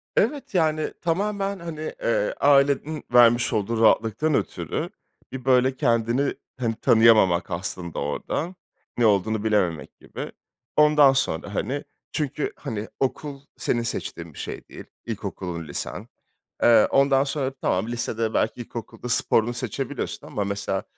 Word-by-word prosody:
Evet, 285 -7 0
yani, 155 -2 +1
tamamen, 195 +3 -1
hani, 160 -2 -5
eee, - - +1
ailenin 145 +2 +3
vermiş 120 0 +5
olduğu 110 +2 0
rahatlıktan 115 +7 +3
ötürü, - - -2 0.4
bir 130 -1 -7
böyle 130 0 +4
kendini, 120 +3 +1 0.3
hani, 115 -3 -1
tanıyamamak 110 -7 +4
aslında 85 -1 -4
orada. 145 - -3 0.4
Ne 120 - +3
olduğunu 105 +1 +2
bilememek 95 -7 0
gibi. - - -7 0.4
Ondan 150 -2 +6
sonra, 100 -6 -1
hani, 140 +3 -2 0.3
çünkü, 150 -1 -2
hani, 110 -1 -5
okul 140 +1 -2 0.2
senin 120 - 0
seçtiğin 115 - -5
bir - - -11
şey - - -6
değil, - - -11 0.2
ilkokulun, 85 -4 -5
lisen. 70 - -5 0.6
Eee, 115 -2 +6
ondan 135 0 +4
sonra, 135 -1 -2
tamam, 95 +5 0
lisede 115 -2 -2
belki 120 - 0
ilkokulda 120 +1 -7
sporunu 115 0 +2
seçebiliyorsun 115 - -4
ama 105 - -2
mesela 100 -1 -2
120 Hz, 130 wpm, -24 LUFS, 110-145 Hz, 0.6 s, Ondan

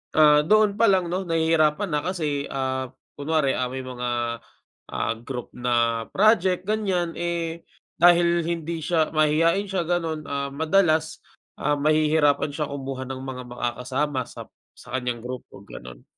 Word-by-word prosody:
ah, 150 -1 +7
doon 215 0 +3
pa 230 - +5
lang 185 -3 +2
'no, 185 0 -2
nahihirapan 165 +2 +2
na 150 - +1
kasi, 150 -6 -2
ah, 130 -1 -2 0.3
kunwari, 150 -2 +1
ah, 125 -1 -1
may 130 +1 -5
mga, 120 -2 -3 0.6
ah, - - 0
group 125 0 -7
na, 120 -2 0
project 190 -3 +3
ganyan, 190 -5 -1
eh, 170 -1 -3 0.3
dahil 170 -1 +5
hindi 165 -1 -3
siya 160 0 0
mahiyain 165 +5 +2
siya 190 -3 -1
ganun, 165 -3 -1
ah, 140 0 -3
madalas, 160 +1 +1 0.3
ah, 145 +1 0
mahihirapan 150 -1 +2
siyang 145 -1 -4
kumuha 135 -1 -5
ng 130 0 -6
mga 130 -1 -6
makakasama 130 +3 -2
sa - - -9 0.3
sa 125 - -14
kanyang 120 -2 -4
grupo, 125 0 -8
ganun. - - -11
155 Hz, 145 wpm, -24 LUFS, 130-170 Hz, 0.6 s, ah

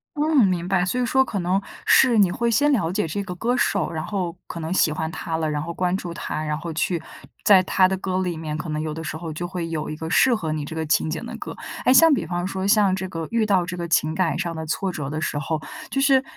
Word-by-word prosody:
嗯， 295 -5 +4
明 175 -1 -1
白， 185 -1 +2
所 250 +7 -1
以 - - +1
说 265 +2 +3
可 210 -5 -3
能， 180 +2 +1 0.3
是 240 -5 +6
你 185 -3 +4
会 235 +4 0
先 290 +6 +3
了 175 -11 +1
解 190 -3 -1
这 200 +6 -3
个 180 -2 -6
歌 240 +7 -1
手， 195 -8 +1
然 160 -2 -4
后 180 -4 -3
可 170 - -7
能 160 +2 -4
喜 175 -4 +3
欢 160 +1 -3
她 160 0 -3
了， 160 -1 -1
然 150 -1 -2
后 170 +2 -5
关 180 +1 0
注 175 -3 -6
她， 155 - -4
然 150 -1 -1
后 165 +2 -5
去 170 +1 -1 0.4
在 195 -3 +6
她 185 0 +3
的 190 0 -1
歌 185 0 -2
里 175 -3 -2
面， 155 -1 -4
可 155 +1 -5
能 150 - -2
有 155 0 -3
的 160 +1 -6
时 155 - -4
候 160 -1 -6
就 175 +3 -4
会 175 -2 -4
有 155 -2 -3
一 155 - -4
个 160 +1 -6
适 255 +1 +5
合 165 -7 -3
你 155 -1 -3
这 160 - -7
个 160 0 -2
情 155 +1 +1
景 - - -4
的 - - -7
歌。 - - -7 0.3
诶， - - +5
像 310 +5 +7
比 270 - -1
方 175 0 -2
说， 190 0 -2
像 200 -3 +4
这 190 0 -4
个 165 -2 -5
遇 230 -1 +2
到 195 -4 +2
这 180 +1 -5
个 170 -1 -4
情 155 -1 +2
感 165 0 0
上 170 -2 -3
的 160 0 -5
挫 190 +4 -1
折 150 -5 -5
的 155 +1 -3
时 150 -2 -2
候， 155 +2 -2 0.3
就 270 - -1
是 270 -1 +4
175 Hz, 305 characters per minute, -23 LUFS, 160-200 Hz, 0.4 s, 像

